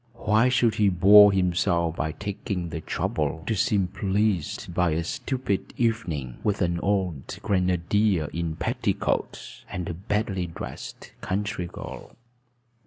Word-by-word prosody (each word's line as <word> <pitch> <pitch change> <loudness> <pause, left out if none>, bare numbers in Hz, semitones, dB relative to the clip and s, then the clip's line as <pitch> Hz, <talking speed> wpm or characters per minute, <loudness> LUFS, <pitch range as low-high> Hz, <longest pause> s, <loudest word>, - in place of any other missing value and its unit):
Why 110 +2 +3
should 125 -3 +3
he 105 -2 +3
bore 100 +3 +8
himself 85 -3 +1
by 80 +2 -2
taking 100 -3 -4
the 80 0 -5
trouble 80 0 -2
to 115 - 0
seem 100 -2 +2
pleased 95 -2 -1
by 90 -2 +2
a 80 +2 -1
stupid 105 +2 -3
evening 85 - -1
with 105 -2 +1
an 85 0 0
old 95 -8 -1
grenadier 90 -1 +1
in 85 -2 -2
petticoats - - -2
and 90 -2 -4
a - - -3
badly 95 0 -2
dressed 85 - -8
country 95 -1 -2
girl? 85 - -9
95 Hz, 130 wpm, -25 LUFS, 85-105 Hz, -, bore